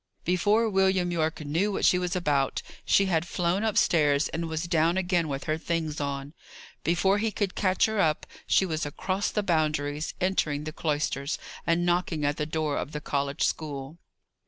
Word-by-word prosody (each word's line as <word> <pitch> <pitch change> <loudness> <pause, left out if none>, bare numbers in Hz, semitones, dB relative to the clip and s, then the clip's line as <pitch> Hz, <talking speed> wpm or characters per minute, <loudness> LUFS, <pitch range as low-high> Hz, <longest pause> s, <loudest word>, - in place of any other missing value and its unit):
Before 205 +6 +3
William 190 -3 +2
Yorke 160 -2 -1
knew 165 +8 0
what 195 - 0
she 180 - +5
was 180 0 -2
about, 145 -6 0 0.2
she 195 - +4
had 170 -3 0
flown 180 +4 0
upstairs, 155 -9 +3
and 165 0 -3
was 160 +1 -2
down 170 0 +2
again 180 -3 +1
with 140 -1 -3
her 155 +1 -1
things 160 -3 -2
on. 140 0 -4 0.5
Before 190 +5 +2
he 220 +1 +1
could 205 -3 -2
catch 185 -2 +2
her 220 -1 -1
up, 155 -5 +2 0.2
she 190 - +4
was 160 -2 -2
across 185 +7 -2
the 210 - -1
Boundaries, 155 -3 0
entering 155 -6 0
the 155 0 -6
cloisters, 150 -2 -1 0.3
and 170 +1 +2
knocking 175 -3 0
at 145 0 0
the 150 - -2
door 155 -2 -1
of 150 - -4
the 150 - -3
college 140 0 -1
school. 145 0 -3
165 Hz, 180 wpm, -27 LUFS, 150-185 Hz, 0.5 s, she